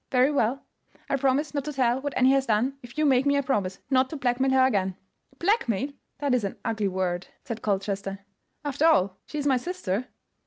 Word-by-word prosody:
"Very 255 +2 +4
well; 270 -1 0 0.5
I - - +3
promise 275 +2 +1
not 285 -2 -1
to 300 - -4
tell 255 -1 +1
what 285 0 -3
Annie 255 +1 +5
has 270 -1 +2
done 235 +5 +1
if 245 +3 -13
you 310 - +2
make 270 -1 +4
me 280 - +4
a 280 - +1
promise 200 -9 -1
not 260 0 +3
to - - -6
blackmail 260 0 +1
her 265 0 +5
again." 190 -7 +1 0.4
"Blackmail! 290 - +1 0.3
that 280 -2 0
is 250 -3 +2
an 200 - -3
ugly 220 -3 0
word," 185 -1 -2 0.2
said 230 -5 -5
Colchester; 195 -1 -2 0.5
"after 290 +3 +2
all, 190 - +3
she 300 - -6
is 290 - -2
my 270 -3 +4
sister." 250 - -3
255 Hz, 205 wpm, -26 LUFS, 210-280 Hz, 0.5 s, Annie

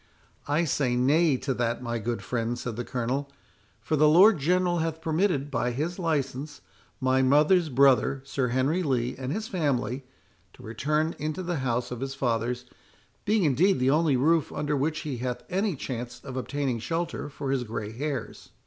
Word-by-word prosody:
"I 150 +4 +2
say 130 -4 0
nay 145 +4 +3
to 135 +1 -2
that, 120 0 -1
my 120 -1 -2
good 115 +2 -3
friend," 120 0 -2
said 120 -2 -5
the 120 - -3
Colonel; 130 +4 -2 0.5
"for 155 - -1
the 150 +1 +5
Lord 185 +4 +7
General 175 +3 +2
hath 160 0 -2
permitted, 160 -3 0
by 125 -1 0
his 155 +9 -3
license, 145 -3 -2 0.4
my 130 0 +2
mother's 150 +6 +4
brother, 135 0 +3
Sir 135 -2 -1
Henry 130 +8 +1
Lee, 125 -6 0
and 130 0 -4
his 215 +6 -3
family, 140 - -1 0.5
to 125 - -15
return 150 +8 -1
into 155 +5 -3
the 175 -1 -2
house 125 -3 -1
of 125 - -4
his 135 0 -4
fathers, 120 0 -1 0.6
being 210 -1 +2
indeed 165 +7 +3
the 130 +1 +2
only 150 -3 +3
roof 160 +4 +2
under 150 0 -1
which 155 +3 -1
he 145 -5 -4
hath 125 0 -4
any 195 0 0
chance 125 -2 -5
of 130 -2 -7
obtaining 130 -2 -2
shelter 165 +5 -3
for 140 -1 -4
his 135 -2 0
grey 110 -2 -5
hairs." 140 +4 -5
140 Hz, 175 wpm, -27 LUFS, 125-160 Hz, 0.6 s, Lord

